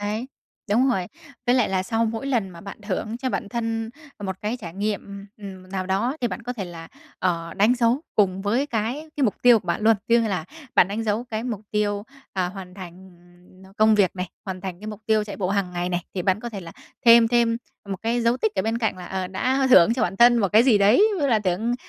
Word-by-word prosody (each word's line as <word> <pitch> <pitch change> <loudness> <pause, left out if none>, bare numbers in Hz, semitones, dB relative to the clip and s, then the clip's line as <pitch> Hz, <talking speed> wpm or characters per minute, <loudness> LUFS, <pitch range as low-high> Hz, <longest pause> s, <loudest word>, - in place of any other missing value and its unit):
đấy. 210 +4 -3 0.4
Đúng 245 +6 +4
rồi. 190 -8 0 0.4
Với 245 - +4
lại 250 -4 +3
là 190 -1 0
sau 225 +3 0
mỗi 225 +3 -3
lần 235 -8 0
mà 170 -1 -12
bạn 200 - -9
thưởng 215 +2 -3
cho 260 0 -2
bản 205 - -3
thân 225 -1 -3 0.3
một 190 -1 -3
cái 215 +4 -2
trải 170 -4 -8
nghiệm, 200 -1 -4
ừm, 190 -3 -10
nào 190 -1 -3
đó 210 +9 0
thì 240 - +1
bạn 190 +3 -6
có 245 +2 -4
thể 215 -6 -5
là, 165 -2 -9 0.3
ờ, 170 -2 -1
đánh 215 +5 +4
dấu 240 +2 +2
cùng 195 -2 +2
với 235 +8 +1
cái 245 +5 -3
cái 280 - +2
mục 210 - +1
tiêu 245 -2 +7
của - - -20
bạn 170 - -1
luôn. 225 0 +5
Ví 235 - +5
dụ 235 - +3
như 225 - -1
là 185 -6 -2 0.3
bạn 180 - +5
đánh 210 +3 -3
dấu 220 +3 0
cái 220 +1 -3
mục 230 -5 -3
tiêu, 205 -1 0 0.3
ờ, 185 -2 -1
hoàn 185 -1 -9
thành 185 0 -11 0.7
công 215 0 +5
việc 195 -3 +2
này, 180 0 -2 0.2
hoàn 190 -2 -5
thành 185 -1 -6
cái 210 - -9
mục 210 -1 -7
tiêu 215 -1 +2
chạy 205 - -7
bộ 185 -3 -2
hàng 195 -2 -1
ngày 175 0 -2
này 175 -1 -2
thì 185 - -2
bạn 190 +3 +1
có 240 - -5
thể 210 -4 -7
là 165 -2 -10 0.3
thêm 230 -1 +8
thêm 235 -1 +2 0.3
một 195 - -3
cái 235 +2 0
dấu 235 +1 +2
tích 220 -4 -1
ở 190 - 0
bên 225 +2 -1
cạnh 220 -4 -1
là, 180 -1 -9
ờ, 190 0 -3
đã 255 +9 0
thưởng 230 -1 +7
cho 255 - -1
bản 185 +2 -1
thân 240 +2 +6
một 200 -4 +2
cái 220 +2 +7
gì 245 -5 +4
đấy, 205 - +5
ví - - -3
dụ 285 - +2
là 235 -5 +3
thưởng 210 +4 -1
210 Hz, 260 wpm, -24 LUFS, 190-230 Hz, 0.7 s, thêm